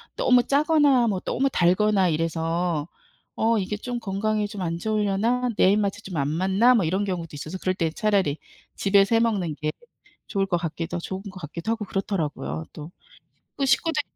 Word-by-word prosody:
너무 250 -1 +4
짜거나 285 -3 +3
뭐 195 -4 0
너무 275 +7 0
달거나 190 0 +3
이래서 165 0 -1 0.5
'어 225 0 +2
이게 205 +1 -2
좀 245 +2 -4
건강에 210 0 -1
좀 205 -2 -7
안 170 -1 -2
좋으려나? 215 +5 0
내 190 - +5
입맛에 205 0 0
좀 180 -5 -6
안 140 +1 0
맞나?' 190 +9 +3
뭐 195 -7 +2
이런 190 +5 0
경우도 175 -4 -3
있어서 155 +5 -6
그럴 185 - 0
때는 165 -3 -1
차라리 195 -9 +1 0.4
집에서 200 +2 +3
해 - - +5
먹는 195 -9 0
게 155 0 -2 0.6
좋을 195 -2 0
것 180 -2 0
같기도 165 +1 -4
좋은 190 +2 -5
것 195 -2 -9
같기도 170 +8 -4
하고 225 -2 -2
그렇더라고요. 150 - -3
또. 155 +3 -9 0.7
또 275 - +1
식구들이 310 +4 +2
195 Hz, 355 characters per minute, -24 LUFS, 170-220 Hz, 0.7 s, 내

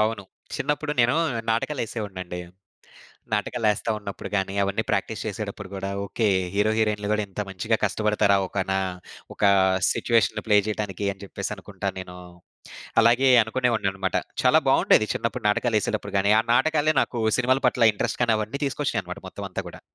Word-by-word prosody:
అవును. 110 -1 0 0.3
చిన్నప్పుడు 150 0 -1
నేను 120 +1 +4 0.4
నాటకాలేసేవోడినండి. 105 -8 -3 0.9
నాటకాలేస్త 105 0 0
ఉన్నప్పుడు 100 -2 -7
గాని, 95 0 -1
అవన్నీ 100 +3 -1
ప్రాక్టీస్ 100 +1 -1
చేసేటప్పుడు 100 -2 -5
గూడా 95 0 -4 0.2
ఓకే, 110 +3 0 0.3
హీరో, 105 +2 +2
హీరోయిన్‌లు 105 -2 0
కూడా 105 0 +1
ఇంత 100 +2 -5
మంచిగా 105 +4 0
కష్టపడతారా, 105 -1 +2
ఒక 95 +1 -2
నా 95 - +1 0.5
ఒక - - -6 0.5
సిట్యుయేషన్‌ని 115 -5 +1
ప్లే 105 - +5
జేయడానికి 105 -2 -3
అని 100 +1 -14
చెప్పేసనుకుంటా - - -5
నేను. 90 -1 -9 0.9
అలాగే 120 +4 +4
అనుకునేవాడనన్నమాట. 110 -6 -1 0.3
చాలా - - +5
బావుండేది 110 - +4
చిన్నప్పుడు 115 0 -3
నాటకాలేసేటప్పుడు 105 -2 0
గాని, 100 +2 +3
ఆ - - +3
నాటకాలే 155 +3 +3
నాకు 120 - -3 0.2
సినిమాల 130 +1 +2
పట్ల 115 -3 +4
ఇంట్రెస్ట్ 105 - -2
గాని, 115 -2 +3
అవన్నీ 110 +6 -4
తీసుకొచ్చినాయన్నమాట 110 -10 -3
మొత్తం - - -7
అంతా - - -4
గూడా. - - -12
105 Hz, 140 wpm, -24 LUFS, 100-115 Hz, 0.9 s, ప్లే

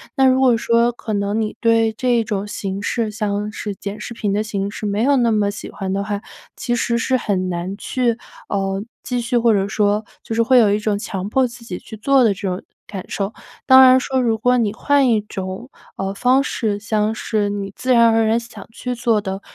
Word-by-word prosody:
那 270 -2 +4
如 260 0 +4
果 255 -3 +5
说 235 +1 +2
可 230 -2 -6
能 200 +1 0
你 215 -1 -3
对 230 -1 +3
这 240 0 +1
种 205 -2 -3
形 195 -1 -4
式， 225 +1 -1
像 210 0 -2
是 210 -1 -5
剪 200 +2 -6
视 235 - -6
频 210 -3 -1
的 205 - +1
形 200 -2 -3
式， 215 - -6
没 205 +1 -1
有 280 +2 +4
那 235 -2 +3
么 210 -2 +2
喜 205 - -8
欢 190 -1 -4
的 195 +1 -1
话， 205 0 -3 0.3
其 240 -2 -2
实 235 -1 0
是 260 +2 +1
很 185 -6 -1
难 175 +2 -3
去 245 +1 0 0.4
嗯 195 +1 -2 0.2
继 250 -1 -2
续 240 +1 0
或 230 -1 +4
者 195 -1 +1
说 210 +1 +1 0.2
就 - - -5
是 230 - +3
会 255 +2 +4
有 215 -4 +4
一 - - +2
种 210 -1 0
强 195 -2 -4
迫 265 +4 +2
自 240 0 -13
己 180 -5 -5
去 220 - -11
做 270 +4 +3
的 220 - +4
这 195 +1 -5
种 185 0 -3 0.2
感 195 -3 -7
受。 200 +2 -3 0.3
当 260 0 +9
然 255 0 +7
说， 260 0 -1
如 230 -2 +1
果 250 +3 +2
你 220 -3 0
换 280 +3 +2
一 225 -2 +3
种 190 +3 -6 0.3
嗯 195 0 -2
方 255 +5 +3
式， 215 -7 -2
像 215 0 0
是 215 -2 -1
你 200 -1 -4
自 255 - -2
然 235 -1 +6
而 225 0 +3
然 225 +2 +2
想 230 -4 -11
去 250 +2 -4
做 230 -2 +1
的 195 -1 -5
220 Hz, 245 characters per minute, -20 LUFS, 200-240 Hz, 0.4 s, 当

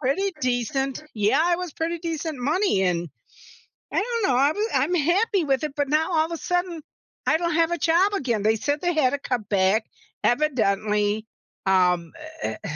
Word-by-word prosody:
pretty 315 +9 0
decent 255 +2 -1
Yeah, 275 +12 +2
it 345 - +1
was 360 -3 -5
pretty 335 +1 -2
decent 320 -3 -4
money 295 - +1
and 175 -2 0 0.9
I - - +2
don't 465 +1 -2
know 255 - +2
I'm 280 +4 +3 0.2
I'm 285 +7 +2
happy 360 +5 +2
with 275 -1 0
it 300 -2 -3
but 285 -1 0
now 315 +4 +1
all 315 -1 +3
of 330 - -9
a 335 - -3
sudden, 355 -1 -2 0.5
I - - +4
don't 340 -1 -1
have 330 0 +3
a 345 - 0
job 340 +6 +3
again, 255 - -1
they 220 +1 +3
said 285 +6 -2
they 350 0 +1
had 260 -5 +3
to 285 - -2
cut 245 -6 -3
back, 200 +2 +2 0.4
evidently, 215 -5 +1 0.4
um, 180 -3 +2 0.3
eh - - -3
eh, - - -5
290 Hz, 190 wpm, -24 LUFS, 220-335 Hz, 0.9 s, I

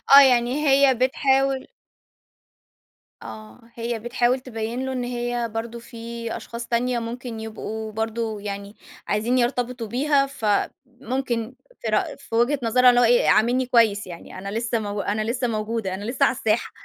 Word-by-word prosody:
آه، 280 - +12
يعني 255 +3 +3
هي 270 -1 +6
بتحاول 265 +1 +1 1.6
آه، 215 +3 -10 0.2
هي 235 -1 -3
بتحاول 240 +2 +1
تبيّن 235 +1 -4
له 265 - -3
إن 250 -1 -2
هي 240 -1 -2
برضه 230 +1 -4
في 235 +1 -13 0.4
أشخاص 235 0 -7
تانية 240 +1 0
ممكن 235 0 -6
يبقوا 220 0 -6
برضه 220 0 -3
يعني 200 0 -6 0.3
عايزين 225 +5 +1
يرتبطوا 245 -1 -1
بيها، 275 +4 +2
فممكن 250 0 -2 0.3
في - - -4
رأ - - 0
في 225 - -7
وجهة 255 +5 +2
نظرها 250 +2 +5
اللي 245 0 +5
هو - - +5
إيه، 240 +1 +4
عاملني 245 +4 +3
كويس 225 -5 +3
يعني. 175 +1 -10
أنا 195 +1 -6
لسه 230 +1 -1
مو 205 -1 -3
أنا 210 +1 -1
لسه 245 +3 -1
موجودة، 215 -3 -2
أنا 195 - -5
لسه 250 +5 +1
على 260 - +1
الساحة. 220 0 0
235 Hz, 155 wpm, -23 LUFS, 220-255 Hz, 1.6 s, آه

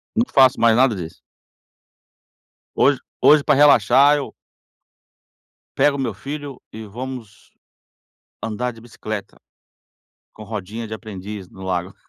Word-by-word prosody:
Não 230 - +3
faço 130 -1 +5
mais 115 -1 +4
nada 130 -3 +3
disso. 85 -3 -8 1.5
Hoje - - +3 0.2
hoje 150 0 +6
pra - - +3
relaxar 140 0 +5
eu 140 - -6 1.4
pego 145 -1 +3
o - - -6
meu 125 -5 -2
filho 140 +5 -7
e 110 0 -9
vamos 120 -1 -9 0.9
andar 115 +3 -3
de 115 - -15
bicicleta, 110 -2 -7 1.0
com 110 - -11
rodinha 110 +1 -6
de 110 - -7
aprendiz 105 -3 -8
no 95 +1 -13
lago. 90 0 -3
115 Hz, 125 wpm, -20 LUFS, 105-135 Hz, 1.5 s, hoje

